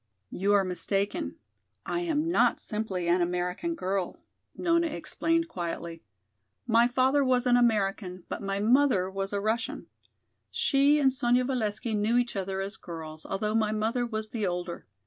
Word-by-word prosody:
"You 200 +2 +1
are 200 -1 +5
mistaken. 195 - -2 0.5
I 345 - -1
am 325 -2 0
not - - +3
simply 205 -5 -1
an 175 +1 +3
American 180 - -1
girl," 190 - -2 0.4
Nona 335 -1 +2
explained 330 +1 -1
quietly. 170 - -5 0.6
"My 235 0 +4
father 260 +3 +3
was 255 -1 +2
an 245 -1 +4
American, 195 -6 +1
but - - -5
my 195 0 -2
mother 220 -4 +3
was 195 0 -3
a 200 - -1
Russian. 220 +3 -2 0.6
She 290 -11 +3
and 270 -2 +3
Sonya 245 -1 +2
Valesky 225 -3 -2
knew 215 +3 +2
each 245 -1 0
other 195 0 -2
as 195 +2 -4
girls, 160 -2 -8
although 210 +2 -1
my 220 -1 +2
mother 220 +3 0
was 220 -2 -4
the 215 -4 -2
older. 175 -1 -4
215 Hz, 155 wpm, -28 LUFS, 190-255 Hz, 0.6 s, are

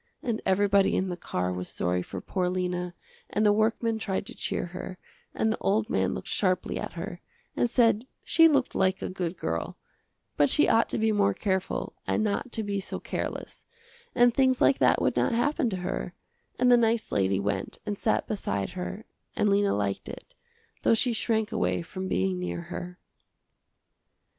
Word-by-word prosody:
And 230 -2 -1
everybody 200 +1 +3
in 190 - 0
the 180 - -3
car 90 - -2
was 90 0 -4
sorry 90 +1 -1
for 95 +1 -7
poor 180 -2 -1
Lena 180 -1 -2 0.3
and 215 - +1
the 205 - +6
workman 220 +1 +1
tried 195 -3 -2
to - - -6
cheer - - -2
her, 185 0 -6 0.4
and 220 0 +1
the - - -6
old 215 +3 +1
man - - +1
looked - - -7
sharply 185 -3 0
at - - -5
her, 175 +1 -6 0.3
and 240 - +1
said 230 0 +3 0.2
she 330 0 +6
looked 280 -5 +2
like 190 0 +1
a - - -2
good 180 -2 -3
girl, 80 +1 -3 0.6
but 145 - +4
she 300 - +4
ought 225 - +3
to - - -1
be 220 0 +2
more 205 -1 +2
careful 190 -3 -2
and 215 - +1
not 215 +4 -1
to 220 - -1
be 200 -1 -2
so 190 - -5
careless, - - -5 0.5
and 245 -1 +5
things 260 0 +3
like 270 - +4
that - - +4
would - - +1
not - - +2
happen 240 +1 +1
to 190 - -3
her, 180 - -4 0.4
and 250 0 +4
the 245 - +8
nice 230 -1 +1
lady 95 0 +2
went 100 -1 -2
and 205 - -2
sat 220 - +1
beside 100 - -2
her 185 +3 -6 0.3
and 210 - +2
Lena 200 0 +3
liked 100 -1 -2
it, - - -10 0.5
though - - +4
she 240 +2 +2
shrank 220 -1 0
away 90 - 0
from 185 - -6
being 185 -1 0
near 180 -1 -3
her. 180 0 -6
200 Hz, 185 wpm, -27 LUFS, 180-225 Hz, 0.6 s, the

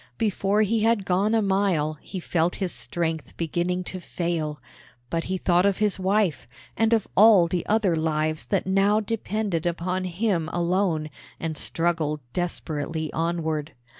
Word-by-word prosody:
Before 210 -1 +1
he 220 +2 +1
had 220 -2 +2
gone 200 +5 +2
a 220 - +2
mile 185 -7 +1
he 190 - -6
felt 170 0 0
his 190 -3 -1
strength 165 -3 -3
beginning 175 +2 -1
to 185 +1 -5
fail; 165 -4 -3 0.5
but 165 0 -1
he 190 +1 -1
thought 175 0 +3
of 200 -1 +2
his 210 -2 +1
wife, 190 - +1 0.3
and 225 0 +2
of 225 -3 +2
all 205 -4 +7
the 175 +1 -1
other 210 -5 +2
lives 155 -3 0
that 120 - 0
now 195 +3 +3
depended 210 -5 -2
upon 180 +2 -2
him 180 -3 -1
alone, 175 -3 0 0.3
and 165 -1 -3
struggled 160 -2 0
desperately 160 -3 -3
onward. 160 -2 -2
175 Hz, 150 wpm, -25 LUFS, 160-200 Hz, 0.5 s, all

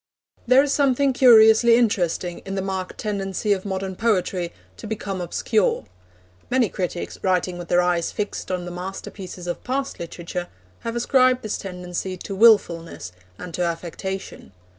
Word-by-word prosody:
There 255 +3 +6
is 285 - 0
something 275 -1 +2
curiously 230 -2 +7
interesting 180 -6 0
in 195 - -6
the 190 - -2
marked 190 -1 -4
tendency 200 0 -1
of 190 0 -4
modern 190 -1 -3
poetry 185 -5 0 0.3
to - - -8
become 200 -3 -4
obscure. 180 - 0 0.6
Many 250 -4 +2
critics, 180 -1 -4
writing 180 -1 0
with 175 - -7
their 180 +1 +3
eyes 175 -1 0
fixed 210 -1 -4
on 180 -1 -2
the 175 - -6
masterpieces 185 0 -7
of 175 - -4
past 270 +2 -3
literature, 170 +1 -5 0.3
have 230 0 -5
ascribed 255 +1 +3
this 215 - -3
tendency 180 0 -5
to 195 - -7
wilfulness 175 - +3 0.3
and 180 -2 -8
to 180 - -3
affectation. 175 - -4
190 Hz, 150 wpm, -23 LUFS, 180-225 Hz, 0.6 s, curiously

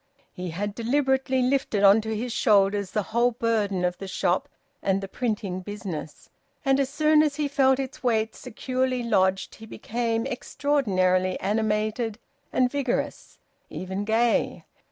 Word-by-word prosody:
He 180 -2 -5
had 200 +5 -3
deliberately 265 +2 +1
lifted 250 -6 +1
on 200 +2 +7
to 220 0 -3
his 240 +1 -3
shoulders 200 -3 +3
the 210 - -1
whole 240 +1 +4
burden 210 -5 0
of 180 0 -2
the 195 - -6
shop 185 +8 0 0.3
and 195 0 +1
the 195 - -6
printing 205 -5 -2
business, 185 -6 -7 0.4
and 270 0 +3
as 270 -1 +1
soon 305 +1 +4
as 300 -2 +1
he 300 -1 0
felt 270 -2 +3
its 270 +3 -5
weight 225 -4 +1
securely 255 +1 -2
lodged 190 -4 +1
he 220 - -12
became 230 +1 -2
extraordinarily 195 -9 0
animated 215 +2 -1 0.3
and 250 -1 +2
vigorous; 275 -4 -2 0.3
even 190 +2 -4
gay. 225 +2 +1
225 Hz, 145 wpm, -25 LUFS, 200-260 Hz, 0.4 s, on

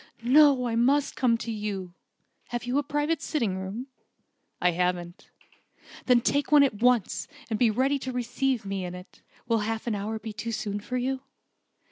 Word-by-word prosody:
"No, 275 0 +6
I 230 -2 -1
must 275 +5 +2
come 240 -3 +2
to 230 - -5
you. 200 -4 -4 0.5
Have 240 0 -4
you 245 +3 0
a - - -1
private 295 +2 -1
sitting 235 -14 -1
room?" 195 +7 -5 0.7
"I 180 - +3
haven't." 175 0 -2 0.8
"Then 250 -2 +5
take 285 +5 0
one 295 -1 +8
at 220 -6 0
once, 245 -5 +2 0.2
and 215 - 0
be 240 - +5
ready 265 +6 +1
to 260 - -4
receive 250 -1 -1
me 195 -1 -3
in 180 0 -5
it. 180 +1 -13 0.3
Will 230 -1 +2
half 220 +1 -3
an 235 - -1
hour 210 +2 -3
be 220 0 -7
too 230 +2 -4
soon 205 -1 -3
for 250 +5 -4
you?" 260 +1 -1
235 Hz, 180 wpm, -27 LUFS, 205-260 Hz, 0.8 s, one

